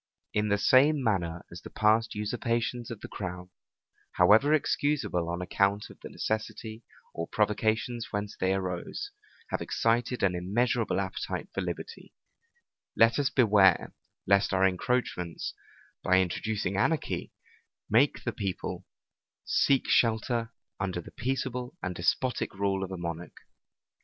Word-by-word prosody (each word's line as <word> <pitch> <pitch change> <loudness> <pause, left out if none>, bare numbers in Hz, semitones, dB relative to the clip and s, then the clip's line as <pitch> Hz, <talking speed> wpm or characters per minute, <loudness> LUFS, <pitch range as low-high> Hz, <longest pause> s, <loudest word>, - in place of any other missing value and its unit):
In 105 0 +1
the 100 - +3
same 135 +7 +4
manner 85 -7 -1
as 85 - -9
the - - -9
past 110 +1 +2
usurpations 115 +2 -2
of 115 -3 -7
the - - -7
crown, 90 -2 -6 0.6
however 110 +11 +5
excusable 140 - +1
on 85 +1 -3
account 100 +3 0
of - - -16
the - - -9
necessity 110 +1 -4 0.3
or 85 0 -4
provocations 110 +2 0
whence 105 0 -3
they 95 +1 +1
arose, 95 - -4 0.4
have - - -1
excited 120 +1 0
an 95 -2 +3
immeasurable 110 +4 0
appetite 95 0 -4
for - - -2
liberty; 455 - -6 0.8
let 115 +4 +5
us 140 -2 +2
beware, 100 -8 +4 0.3
lest 100 0 +3
our 95 0 +4
encroachments, 90 -3 -2 0.5
by 95 0 +4
introducing 95 +2 -1
anarchy, 155 +9 0 0.6
make 130 +7 +3
the 120 - -2
people 100 -4 -4 0.6
seek 135 -2 +2
shelter 115 0 +2 0.3
under 95 -2 -2
the 85 - -10
peaceable 125 +2 -3
and 90 - -2
despotic 95 +8 0
rule 95 -1 0
of 95 - -4
a 95 - -4
monarch. 85 0 -6
105 Hz, 130 wpm, -29 LUFS, 95-120 Hz, 0.8 s, however